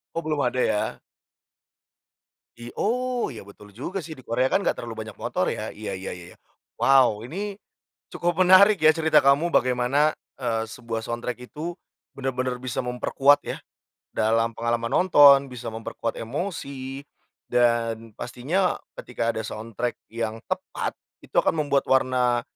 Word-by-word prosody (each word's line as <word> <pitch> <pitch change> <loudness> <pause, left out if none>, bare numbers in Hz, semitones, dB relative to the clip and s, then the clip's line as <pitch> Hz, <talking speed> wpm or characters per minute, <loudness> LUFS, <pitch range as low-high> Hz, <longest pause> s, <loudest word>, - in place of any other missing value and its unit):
Oh, 165 - -1
belum 150 -2 0
ada 125 0 0
ya? 105 - 0 1.6
I 120 +1 -9
oh, 250 +2 0
ya, 110 -6 -9
betul 105 0 -15
juga 180 - -4
sih 160 -1 -9
di 130 - -13
Korea 125 +3 +1
kan - - +1
gak - - +3
terlalu - - -6
banyak - - -11
motor - - -1
ya? - - -4
Iya - - -6
iya 95 0 -5
iya, 90 0 -12 0.4
wow 130 -6 +4
ini, 195 - -5 0.6
cukup 175 +1 +1
menarik 195 +3 +7
ya 155 0 +7
cerita 155 -2 +3
kamu 140 +5 +4
bagaimana, 130 +2 +2 0.2
eee, 115 -4 -1
sebuah 115 -1 -5
soundtrack 120 +2 -4
itu, 165 +4 -5 0.4
bener-bener 130 -2 -3
bisa 130 0 -3
memperkuat 135 +3 +3
ya, - - -3 0.6
dalam 115 +1 +1
pengalaman 115 0 -1
nonton 145 -6 +7
bisa 120 -3 -7
memperkuat 115 +1 -5
emosi, 140 - -5 0.4
dan 115 -2 +1
pastinya 145 +11 -1 0.2
ketika 115 -1 -2
ada 110 - -4
soundtrack 115 +3 -4 0.2
yang 115 -1 -3
tepat - - -3 0.3
itu - - -18
akan - - +1
membuat 140 -1 +1
warna, 125 -2 +2
125 Hz, 145 wpm, -25 LUFS, 115-150 Hz, 1.6 s, menarik